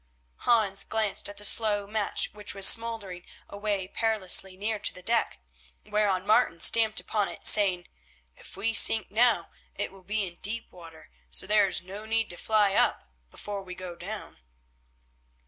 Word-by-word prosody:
Hans 205 -5 0
glanced 215 -2 -2
at 205 - -12
the 205 - -2
slow 205 -1 +3
match 210 -1 -2
which 210 -1 -6
was 195 -1 +2
smouldering 220 -6 +1 0.2
away 200 -2 -3
perilously 195 -3 +1
near 210 +2 -3
to - - -2
the 180 - -12
deck, 230 +3 0 0.5
whereon 205 -3 -1
Martin 215 -5 +2
stamped 220 +3 +5
upon 210 -2 -2
it, - - -12
saying: 190 -4 +4 0.5
"If - - -12
we 230 - -1
sink 220 -1 +4
now 235 +2 +1 0.2
it - - -4
will 195 0 -16
be 205 +2 -3
in 175 -1 -11
deep 230 +3 -6
water, 165 - -15 0.2
so 60 - +1
there 210 0 +3
is 185 - -3
no 200 +4 -10
need 225 -2 -1
to 175 - -7
fly 210 -3 +1
up 65 - 0 0.2
before 205 - -7
we 180 -1 -10
go 180 -1 -8
down." 205 +5 -9
205 Hz, 165 wpm, -27 LUFS, 190-220 Hz, 0.5 s, stamped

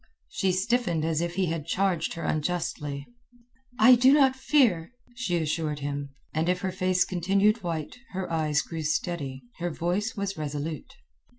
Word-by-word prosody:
She 190 - 0
stiffened 185 -4 +1
as 160 -1 0
if 170 0 -2
he 190 0 +1
had 165 -2 -3
charged 185 -1 0
her 170 - -5
unjustly. 150 -3 -2 0.7
"I 240 +4 +8
do 250 +2 +6
not 270 -3 +5
fear," 250 - +2 0.2
she 230 -8 -1
assured 155 -1 -1
him, 140 -1 -4 0.2
and 160 +2 0
if 180 0 +1
her 190 - -1
face 185 0 +2
continued 195 +5 +2
white, 170 +5 -4 0.2
her 190 0 -3
eyes 155 -2 +1
grew 165 -1 -5
steady, 150 -4 -2 0.2
her 175 0 -1
voice 180 +7 -1
was 200 -1 -2
resolute. 155 - -5
175 Hz, 160 wpm, -27 LUFS, 155-195 Hz, 0.7 s, I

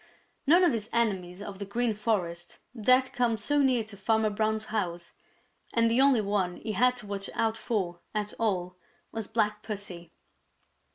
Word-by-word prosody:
None 345 +5 +6
of 345 - +5
his 220 -1 -3
enemies 195 -5 0
of 200 -2 -8
the 200 - -4
Green 235 +2 0
Forest 180 -6 -2 0.2
dared 255 +3 +3
come 240 -2 +1
so 290 +8 +1
near 255 -4 +3
to 215 -1 -11
Farmer 220 +2 +1
Brown's 220 +1 0
house, 175 -5 -2 0.6
and 230 -1 +4
the 240 +3 +4
only 270 -4 +5
one 195 -3 -1
he 220 - -4
had 250 +5 +3
to 240 -3 -9
watch 200 -1 -4
out 225 -1 +1
for 185 -7 -2
at 210 -1 -2
all 180 -5 -1 0.3
was 225 -2 -4
Black 210 -2 0
Pussy. 195 -6 -7
215 Hz, 170 wpm, -29 LUFS, 195-230 Hz, 0.6 s, None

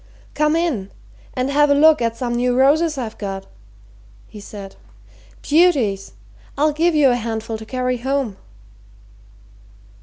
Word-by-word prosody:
"Come 300 +1 +1
in 295 - -1 0.5
and 255 +1 -1
have 295 +1 +3
a 285 - +4
look 310 -1 +5
at 230 -1 -1
some 240 -1 -2
new 245 +1 0
roses 305 +3 +3
I've 230 -4 -5
got," 195 -2 -5 0.8
he 210 - -12
said. 200 -1 -10 0.7
"Beauties! 275 - +2 0.4
I'll 300 +1 +2
give 330 +2 +1
you 290 -3 +5
a - - +2
handful 225 -1 -4
to 220 - -11
carry 255 0 -1
home." 260 -4 -2
255 Hz, 140 wpm, -20 LUFS, 225-295 Hz, 0.8 s, look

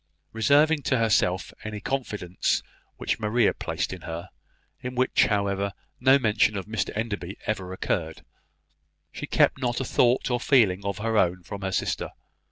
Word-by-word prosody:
Reserving 145 +7 +4
to 130 - +2
herself 100 -5 +1
any 105 0 -5
confidence 105 -9 -1 0.3
which - - -2
Maria 110 +2 +2
placed - - -3
in 90 - -8
her 85 +2 -6 0.5
(in 125 0 -6
which, 130 +1 +3
however, 100 -1 0 0.3
no 130 +2 +6
mention 110 -4 +2
of 95 - -4
Mr 110 +1 -2
Enderby 100 -4 -3
ever 95 -4 -2
occurred), 80 -3 -3 0.9
she - - -6
kept 130 - +3
not 120 -1 0
a 135 - -2
thought 125 +2 +2
or 120 - +1
feeling 105 -8 +3
of 100 0 -2
her 110 0 +1
own 90 0 +1
from 100 +3 -7
her 95 0 -2
sister. - - -1
105 Hz, 160 wpm, -26 LUFS, 95-120 Hz, 0.9 s, no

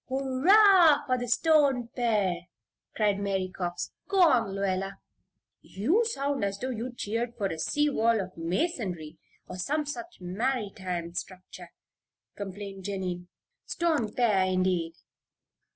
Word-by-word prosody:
"Hurrah 305 +5 +5
for 255 -2 +1
the 245 - -4
Stone 275 -3 +3
pere!" 205 -8 0 0.5
cried 205 -2 +1
Mary 195 -2 -1
Cox. 175 -1 -3 0.2
"Go 390 -1 +2
on, 250 - +4
Lluella." 195 0 -1 0.7
"You 310 - +1
sound 280 - -1
as 200 0 -1
though 260 +5 -3
you 240 +1 -4
cheered 235 +1 -3
for 205 - -2
a 165 -4 -3
sea 295 - +1
wall 230 -3 +2
of 190 -1 -5
masonry, 175 - -3 0.3
or - - -7
some 295 +11 -1
such 345 +4 -7
maritime 185 -4 -3
structure," 185 +1 -8 0.7
complained 195 -1 -7
Jennie. 185 -3 -4 0.4
"'Stone 310 -11 0
pere,' 200 -6 +2
indeed!" 185 -3 0
215 Hz, 125 wpm, -28 LUFS, 185-270 Hz, 0.7 s, Hurrah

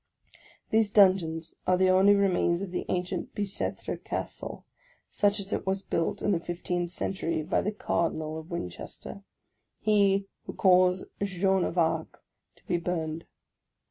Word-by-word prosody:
These 220 -1 +3
dungeons 180 -5 +3
are 185 - +4
the 185 0 +4
only 195 +2 +6
re 200 0 +4
mains 175 0 +1
of 190 - -6
the 180 - -3
ancient 180 0 -2
Bicetre 200 -2 -3
Castle, - - -5 0.5
such 205 +1 +2
as 200 +1 -4
it - - -3
was 195 +1 0
built 165 -3 -1
in 205 - +2
the 175 - +2
fifteenth 175 0 -3
century 165 -3 -2
by 165 - +1
the 210 - -1
Cardinal 160 -6 -1
of 160 +2 -12
.Winchester, 170 - -6 0.6
he 200 -2 +3 0.2
who - - -5
caused 185 -1 +4 0.2
Jeanne 190 -1 +1
of 180 - -4
Arc 160 -1 0 0.3
to - - -27
be 175 - 0
burned. 165 -2 -3
185 Hz, 150 wpm, -28 LUFS, 170-195 Hz, 0.6 s, only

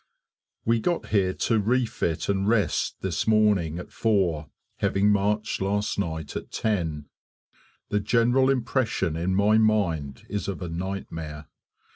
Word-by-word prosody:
We 115 0 +3
got 175 +8 -1
here 95 -3 +2
to 110 +4 +1
refit 110 -7 0
and 100 0 0
rest 105 -8 +1
this 95 +2 -2
morning 105 -7 +3
at 90 - -8
4, 90 -9 +1 0.3
having 100 +1 +2
marched 105 +1 0
last 100 +2 0
night 80 -5 -3
at - - -5
10. 80 -9 -1 0.8
The 105 - +1
general 120 +5 +3
impression 120 - 0
in 90 +3 0
my 105 +2 +4
mind 85 -11 0
is 105 -1 -3
of 100 -1 -4
a 90 - -4
nightmare. 80 -4 -5
100 Hz, 135 wpm, -26 LUFS, 85-110 Hz, 0.8 s, my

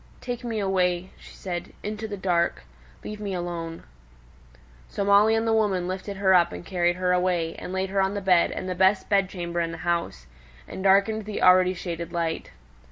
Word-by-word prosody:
"Take 245 0 -5
me 230 -3 -3
away," 185 -2 0
she - - -14
said, 175 -2 -6
"into 215 +1 -4
the 205 -1 -6
dark. 170 - 0 0.4
Leave 210 0 -7
me 200 -2 -3
alone." 170 -2 -5 1.1
So 200 - -2
Molly 205 +2 +5
and 225 0 0
the 225 - +2
woman 200 -5 +1
lifted 190 +2 -5
her 190 -1 +3
up 175 -1 +4
and - - -8
carried 175 -2 +1
her 180 0 +1
away, 180 -2 0
and - - -7
laid 190 0 -2
her 195 0 +2
on 190 +1 0
the - - -1
bed, 180 -3 +4
in - - -5
the 185 - -2
best 190 +2 +2
bed 195 -2 +2
chamber 175 -2 -4
in 165 0 -2
the 165 - -7
house, 170 - -1 0.4
and 190 - -7
darkened 200 +2 +3
the 210 -1 -4
already 185 0 +5
shaded 170 -1 -5
light. 165 -2 -2
185 Hz, 200 wpm, -25 LUFS, 175-200 Hz, 1.1 s, Molly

